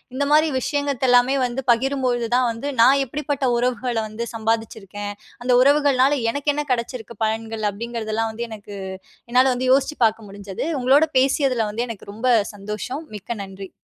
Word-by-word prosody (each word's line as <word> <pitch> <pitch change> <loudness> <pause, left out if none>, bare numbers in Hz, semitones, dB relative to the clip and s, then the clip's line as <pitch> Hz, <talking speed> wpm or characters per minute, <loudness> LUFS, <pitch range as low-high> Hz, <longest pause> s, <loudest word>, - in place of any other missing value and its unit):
இந்த 280 - 0
மாதிரி 310 +1 +5
விஷயங்கள் 285 -2 -1
எல்லாமே 245 +2 +5
வந்து 250 +2 -3
பகிரும்பொழுது 245 -1 0
தான் 250 0 +3
வந்து, 230 +5 -6
நான் 270 +4 +6
எப்படிப்பட்ட 285 +1 -3
உறவுகள 245 0 -1
வந்து 215 +2 -5
சம்பாதிச்சுருக்கேன்? 220 -2 -3 0.3
அந்த 250 - +1
உறவுகள்னால 280 -1 +4 0.2
எனக்கு 285 +3 0
என்ன 295 0 -2
கிடைச்சிருக்கு 235 -1 -5
பலன்கள்? 220 0 -3
அப்பிடிங்கிறதெல்லாம் 225 0 -3
வந்து 235 +2 -4
எனக்கு 210 -2 -10 0.6
என்னால 250 +2 +5
வந்து 255 +1 -2
யோசிச்சு 275 +3 +2
பார்க்க 220 -1 0
முடிஞ்சது. 195 -1 -6 0.2
உங்களோட 270 +5 +5
பேசியதில 260 -3 +2
வந்து 230 +3 -2
எனக்கு 225 -4 -8
ரொம்ப 225 +5 -2 0.3
சந்தோஷம். 210 +8 -5
மிக்க 210 +3 -5
நன்றி. 195 -1 -9
240 Hz, 150 wpm, -22 LUFS, 220-270 Hz, 0.6 s, நான்